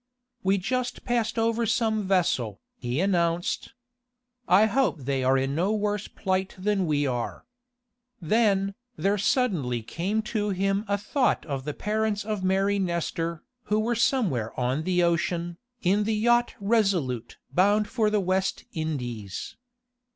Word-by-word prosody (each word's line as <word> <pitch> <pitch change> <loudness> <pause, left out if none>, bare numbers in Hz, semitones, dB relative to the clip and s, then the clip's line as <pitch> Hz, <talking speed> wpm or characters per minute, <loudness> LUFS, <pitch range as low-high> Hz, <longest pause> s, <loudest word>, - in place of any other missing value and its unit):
"We 195 +1 +2
just 250 +6 -2
passed 240 -2 0
over 230 0 +1
some 220 -2 +1
vessel," 130 - +1 0.2
he 125 +2 -2
announced. 175 +4 0 0.7
"I 195 +4 +6
hope 220 - +1
they 135 0 -1
are 130 +1 +4
in 135 +1 0
no 185 +8 +1
worse 210 -1 -1
plight 190 -1 -2
than 195 -1 0
we 145 -1 +1
are." 125 - -3 0.7
Then, 200 +1 +2 0.2
there 200 +1 +1
suddenly 170 - +1
came 195 - -2
to 215 -1 -1
him 195 +2 0
a 200 0 +1
thought 250 +6 0
of 135 -4 -4
the 150 - -3
parents 210 -1 -1
of 210 -3 -3
Mary 195 +2 +2
Nestor, 170 -2 -2 0.2
who 210 +1 +1
were 230 +2 +1
somewhere 200 - 0
on 130 +5 0
the 180 -1 +2
ocean, 170 0 0 0.2
in 200 +3 +3
the 220 0 +1
yacht 240 +2 +2
RESOLUTE 195 - 0 0.2
bound 205 +3 +3
for 220 -4 +1
the 210 0 +2
West 190 +1 0
Indies. 120 - -4
195 Hz, 145 wpm, -26 LUFS, 165-215 Hz, 0.7 s, I